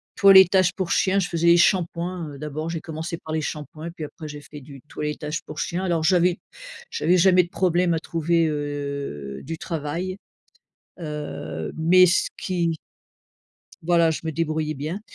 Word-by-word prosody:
toilettage 190 -2 +6
pour 185 -3 -3
chien, 195 +1 +2
je 180 - 0
faisais 170 0 0
les 170 0 +7
shampoings, 175 -1 +1
heu, - - -10
d'abord 150 +2 -4
j'ai 165 -1 -4
commencé 160 +1 -5
par 155 -1 -8
les 160 - 0
shampoings 155 +1 -6
et 170 - -6
puis 165 - -8
après 155 +1 -10
j'ai 145 -1 -8
fait 150 0 -11
du 135 0 -12
toilettage 150 +1 -4
pour 150 0 -9
chien. 180 +2 -2
Alors 170 -3 0
j'avais 180 +1 +3 0.5
j'avais 185 - +2
jamais 180 0 +5
de 175 - -10
problème 180 -2 +1
à 160 - 0
trouver, 165 0 0
heu, 140 - -4
du 165 +3 -5
travail, 165 +4 -4 0.8
heu, 145 - -5
mais 180 +3 +6
ce 180 +2 +2
qui 170 -3 -1 1.1
voilà 170 0 +3
je 160 - -3
me 160 - -2
débrouillais 155 -1 -1
bien. 155 +8 -4
165 Hz, 170 wpm, -23 LUFS, 150-180 Hz, 1.1 s, les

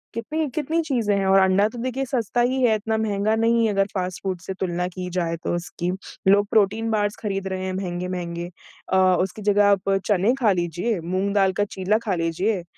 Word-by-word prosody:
कितनी 300 +7 -2
कितनी 310 +2 0
चीज़ें 230 -9 0
हैं 195 - 0
और 195 0 +6
अंडा 190 +2 +4
तो 240 - -10
देखिए 260 +1 -2
सस्ता 240 -1 -1
ही 260 +2 +1
है 220 -3 +4
इतना 220 +1 -1
महँगा 215 0 0
नहीं 230 0 +2
है 215 - +1
अगर 195 0 +2
फ़ास्ट 185 -2 -3
फूड 185 -2 -2
से 190 - -5
तुलना 180 -1 -1
की 180 0 -6
जाए 170 -1 0
तो - - -1
उसकी। 175 0 -3 0.4
लोग 205 +1 +5
प्रोटीन 220 +2 +2
बार्स 205 -1 0
खरीद 195 -2 -2
रहे 185 0 -3
हैं 185 - -3
महँगे-महँगे 175 -2 -4 0.4
अ, - - +5 0.2
उसकी 190 +3 -3
जगह 205 0 +3
आप 195 -1 +1 0.2
चने 205 +4 +2
खा 220 -5 +4
लीजिए, 175 +4 -1
मूँग 185 +4 -1
दाल 195 -2 +3
का 205 +1 0
चीला 200 +1 0
खा 195 -3 0
लीजिए, 175 +4 -1
200 Hz, 205 wpm, -23 LUFS, 185-220 Hz, 0.4 s, और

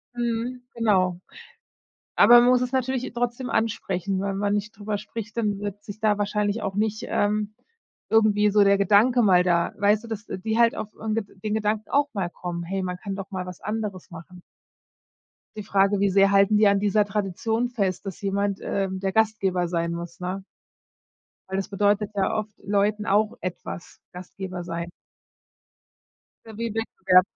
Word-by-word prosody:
Mhm, 240 +1 -2
genau. 185 -6 +2 1.0
Aber 240 0 +8
man 245 - +4
muss 250 -1 +4
es 250 0 -2
natürlich 260 0 -1
trotzdem 245 +1 -2
ansprechen, 195 -3 -1
wenn 195 -1 -2
man 205 0 0
nicht 210 +1 -3
darüber 205 0 -3
spricht, 220 +1 -8
dann 205 -3 0
wird 205 0 -6
sich 215 -1 -9
da 210 -1 +2
wahrscheinlich 210 +1 -1
auch 195 -1 -3
nicht, 215 +1 -1
ähm, 210 0 0 0.5
irgendwie 210 -2 +4
so 205 0 +5
der 200 0 +4
Gedanke 215 +6 +4
mal 185 -5 +5
da 170 -1 +2
weißt 205 +2 +2
du, - - -9
dass 220 -2 -6
die 220 +4 -3
halt 235 -1 +4
auf 215 - -5
'n 220 -1 -2
Ged 200 -4 -6
den 215 -1 -1
Gedanken 215 0 -1
auch 285 +1 +2
mal 190 -4 -2
kommen: 175 -1 -5
„Hey, 190 +3 -3
man 180 -1 -3
kann 195 +1 -5
doch 195 0 -7
mal 185 -1 -4
was 180 -1 -9
anderes 210 -3 -4
machen.“ 180 +1 -11 1.1
Die 215 - -5
Frage, 195 0 +2
wie 200 0 +3
sehr 195 +1 +4
halten 200 +1 +4
die 210 0 +5
an 200 0 +3
dieser 205 +1 +2
Tradition 215 +4 -1
fest, 200 -5 -2
dass 190 - -6
jemand, 200 0 -1
ähm, 190 -1 -2
der 195 0 -1
Gastgeber 195 -5 +1
sein 170 -1 -1
muss, 170 0 -6
ne? 185 +2 -4 1.1
Weil 190 - -2
das 195 - -2
bedeutet 205 +1 +1
ja 195 -1 +1
oft 215 0 -3
Leuten 205 +1 +1
auch 210 +2 +1
etwas, 180 -1 -7
Gastgeber 180 0 -7
sein. 170 0 -5 1.5
So 225 - -10
wie 230 - -2
'n 215 - -5
Wettbewerb. 190 -5 +3
205 Hz, 180 wpm, -25 LUFS, 190-220 Hz, 1.5 s, Aber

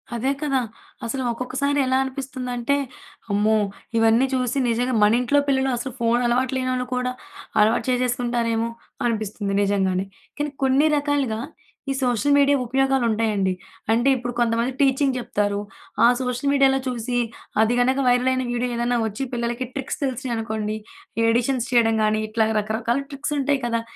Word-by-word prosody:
అదే 255 +4 0
కదా! 275 -3 +1 0.5
అసలు 260 +3 -2
ఒక్కొక్కసారి 265 +4 -1
ఎలా 260 0 +2
అనిపిస్తుందంటే, 260 -1 -3 0.6
అమ్మో! 210 +2 +3 0.4
ఇవన్నీ 225 +3 +4
చూసి 255 0 0
నిజంగా, 245 +2 0
మనింట్లో 245 +6 +3
పిల్లలు 265 -1 +2
అసలు 255 +1 -5
ఫోనలవాటు 240 +2 +1
లేనోళ్ళు 255 -1 -1
కూడా, 250 0 -1 0.5
అలవాటు 215 +2 +3
చేసేసుకుంటారేమో! 240 -2 0 0.4
అనిపిస్తుంది 215 -3 -2
నిజంగానే. 190 -2 +1 0.3
కానీ, 295 0 -2
కొన్ని 270 +3 +4
రకాలుగా, 285 -6 0 0.5
ఈ - - +1
సోషల్ 250 +3 +2
మీడియా 285 0 +4
ఉపయోగాలుంటాయండి. 230 -6 +1 0.4
అంటే, 240 +4 +3
ఇప్పుడు 245 0 -4
కొంతమంది 235 +2 +1
టీచింగ్ 270 -1 +3
జెప్తారు, 205 -4 -1 0.5
ఆ - - +8
సోషల్ 255 +2 -1
మీడియాలో 270 -1 +4
చూసి, 245 -1 -2 0.4
అది 225 +2 +3
గనక 260 +2 +2
వైరలయిన 255 +1 +2
వీడియో 245 +1 -1
ఏదన్నా 240 +1 +1
వచ్చి, 215 +5 -4
పిల్లలకి 240 +1 -2
ట్రిక్స్ 270 -2 -4
తెలిసినియి 260 -2 -2
అనుకోండి, 220 -1 -3 0.4
ఈ - - +3
ఎడిషన్స్ 245 +1 0
చేయడం 225 -2 +3
గానీ, 215 0 +2
ఇట్లాగ 220 0 +1
రకరకాల 225 +4 -1
ట్రిక్సుంటాయి 285 0 -1
కదా! 230 -1 0
245 Hz, 135 wpm, -23 LUFS, 225-265 Hz, 0.6 s, ఆ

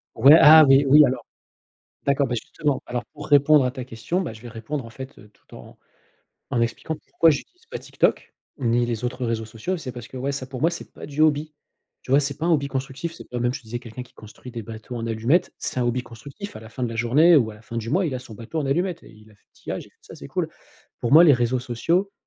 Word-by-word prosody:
Ouais, 140 +3 +7
ah 155 +1 +9
oui, 135 +1 +6
oui, 150 +2 +8
alors, 130 0 -3 0.8
d'accord, 140 0 +2
bah, 120 - -2
justement, 145 +4 -2
alors 120 0 -4
pour - - -9
répondre 145 -1 +5
à 125 - -1
ta 130 -2 -6
question, 120 +10 -3
bah, 170 - -4
je 110 - -13
vais 120 - -10
répondre, 120 +5 -5
en 115 - -10
fait, 130 +3 -10
tout - - -20
en - - -13 0.7
en 120 - 0
expliquant 115 +7 -2
pourquoi 165 +1 +2
j'utilise 360 - -5
pas 475 - -6
TikTok, - - -1 0.3
ni 120 -2 +1
les 115 -1 -3
autres 125 +1 -3
réseaux 115 -1 -2
sociaux, 115 +12 -4
c'est 145 -7 -6
parce 120 -1 -9
que, 130 - -12
ouais, 135 +2 -2
ça 135 -2 -4
pour 130 -1 -8
moi, 165 - +3
c'est 170 - -8
pas - - -11
du 145 +1 -5
hobby. 155 0 +2 0.5
Tu 130 - -5
vois, 140 - +6
c'est 140 -1 -3
pas 165 - -2
un 175 - +3
hobby 140 -3 +1
constructif, 135 +5 -4
c'est - - -13
pas 125 - -4
même 120 +1 +1
je 140 - -5
te - - -26
disais 120 +2 -6
quelqu'un 120 +1 -9
qui 120 - -24
construit 110 +3 -13
des 115 - -6
bateaux 110 +3 -9
en 115 -1 -4
allumettes, 120 +11 +1
c'est 130 - -2
un - - +2
hobby 120 +1 0
constructif, 140 - -10
à - - -9
la 110 - -12
fin 125 +2 -4
de - - -1
la 115 - -6
journée 135 +10 +4
ou 120 -7 +3
à - - -11
la 105 - -18
fin 115 - -8
du 115 0 -4
mois, 180 +4 +2
il 140 - -3
a 125 - -4
son 115 -4 -12
bateau 120 +9 -5
en 140 - -2
allumettes 175 +5 -1
et - - -15
il 110 -1 -18
a 105 - -20
fait 105 - -33
tillage - - -7
et - - -21
ça - - -13
c'est - - -11
cool. - - -2 0.5
Pour 120 - -2
moi 160 +5 +8
les 155 - +7
réseaux 125 0 +1
sociaux, 165 - -1
130 Hz, 270 wpm, -23 LUFS, 115-150 Hz, 0.8 s, ah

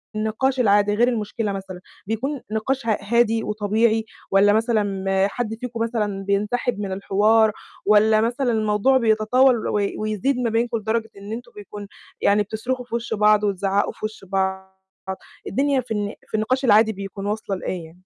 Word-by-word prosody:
النقاش 225 +5 0
العادي 205 -2 +3
غير 240 +3 +3
المشكلة 220 -2 -2
مثلًا، 190 -2 -6 0.3
بيكون 255 +5 -2
نقاش 230 +3 -2
ه 215 - +2
هادي 225 +1 +2
وطبيعي؟ 220 +2 +1 0.3
والّا 200 +1 +5
مثلًا 210 -4 0 0.2
حد 225 -1 -3
فيكم 230 -1 -6
مثلًا 210 -4 -2
بينسحب 205 +3 0
من 200 -2 -3
الحوار؟ 210 +3 +3 0.3
والّا 215 +1 +5
مثلًا 240 +2 0
الموضوع 215 +4 +2
بيتطاول 230 +2 +3
وي 205 -1 -1
ويزيد 215 +5 -1
ما 235 -2 0
بينكم 230 +1 0
لدرجة 220 +1 -2
إن 200 +2 -9
أنتم 240 +1 -7
بيكون 205 0 -9 0.3
يعني 205 +1 +3
بتصرخوا 245 +4 -4
في 235 - -5
وش 235 -1 -3
بعض 210 0 +4
وتزعّقوا 200 0 0
في - - -6
وش 215 -2 -7
بعض؟ 190 0 -1 0.8
الدنيا 275 -1 +1
في 235 -2 -16
الن 205 0 -2
في - - -4
النقاش 255 +5 0
العادي 220 0 +5
بيكون 195 0 -7
واصلة 205 -1 -2
لإيه 180 - -4
يعني؟ 160 - -13
215 Hz, 165 wpm, -22 LUFS, 205-235 Hz, 0.8 s, والّا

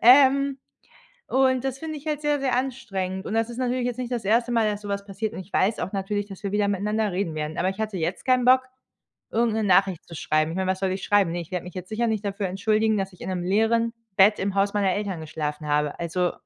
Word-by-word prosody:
Ähm, 275 +2 +6 0.7
und 260 -1 +2
das 270 0 -3
finde 315 0 -5
ich 290 - -13
halt 300 -1 -1
sehr, 295 -1 +1
sehr 260 -3 +1
anstrengend 195 -8 -3
und - - -4
das 225 +1 +1
ist 240 - -7
natürlich 250 -1 0
jetzt 245 -1 -2
nicht 250 -1 -4
das 235 -4 -2
1. 235 +4 +2
Mal, 225 -2 +3
dass 205 0 -3
so 205 - -7
was 200 0 -3
passiert 205 +2 -4
und - - -6
ich 190 +1 -10
weiß 210 +4 +2
auch - - -3
natürlich, 205 +1 -2
dass 195 -1 -11
wir 200 - -2
wieder 205 0 +2
miteinander 210 +2 0
reden 180 -2 -2
werden. 155 +1 -4
Aber 185 - +1
ich 190 +2 -6
hatte 215 -3 -2
jetzt 175 +2 -3
keinen 255 -1 +3
Bock, 255 +1 +7 0.7
irgend 230 -1 +2
'ne 220 - 0
Nachricht 190 -2 +3
zu 170 - -9
schreiben. 155 +1 +1
Ich - - -5
meine, 190 0 0
was 190 - -4
soll 190 -1 0
ich 190 +1 -4
schreiben? 200 -5 +3
Ne, 175 - -2
ich 170 - -11
werde 180 -1 -2
mich 180 - -9
jetzt 185 0 -7
sicher 235 +2 0
nicht 220 -2 -1
dafür 200 0 -2
entschuldigen, 215 +3 +1
dass 195 -1 -2
ich 180 - -17
in - - -5
'nem 180 -2 -2
leeren 225 +5 +2 0.2
Bett 205 +3 +5
im 195 0 -1
Haus 200 +1 +2
meiner 200 -2 +2
Eltern 200 -4 -3
geschlafen 150 -1 -4
habe. 150 0 0
Also 175 +1 0
205 Hz, 265 wpm, -25 LUFS, 185-235 Hz, 0.7 s, Bock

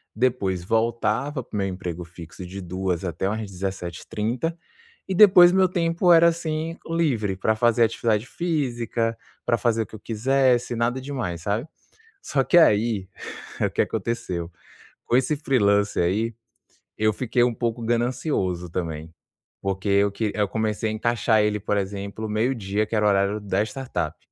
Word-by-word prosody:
depois 105 -7 0
voltava 115 - 0
pro 105 - -7
meu 95 -1 0
emprego 90 -2 -5
fixo 85 +1 -10
de 95 +2 -7
14h 90 0 -2
até 90 +1 -2
umas 105 -1 -3
17h30, 100 - -3 0.5
e 190 - -2
depois 185 -3 +8
meu 190 0 +4
tempo 170 0 +2
era 170 0 +7
assim, 165 0 -3
livre 135 - 0
pra 110 +3 +1
fazer 120 +1 +3
atividade 110 -1 +1
física, 120 -8 -2 0.3
pra 120 - +2
fazer 115 0 +1
o - - -10
que 110 - -12
eu - - -10
quisesse, 125 +2 +1
nada 120 +3 0
demais, 125 -12 -4
sabe? 105 - -2 0.6
Só 135 -2 0
que 175 - +5
aí, 105 - +3 0.5
o - - +1
que - - 0
aconteceu? 95 -6 -3 0.6
Com 120 - +3
esse 135 +4 +1
freelancer 105 - +2
aí, 110 +6 0 0.6
eu 110 0 +2
fiquei 120 +1 0
um 120 - +1
pouco 115 0 -2
ganancioso 115 - -1
também, 80 -2 -4 0.5
porque 95 +1 -3
eu 100 0 +3
que 105 0 -2
eu 105 -1 +2
comecei 110 +1 -1
a - - -2
encaixar 110 0 +2
ele, 105 0 +1
por 105 +1 -1
exemplo, 100 +2 -4
meio 110 +5 +1
dia 105 -1 -1
que - - -5
era 105 - +2
o - - +6
horário 100 +1 +2
da 100 -1 -1
startup. 130 +3 -4
110 Hz, 160 wpm, -24 LUFS, 100-125 Hz, 0.6 s, depois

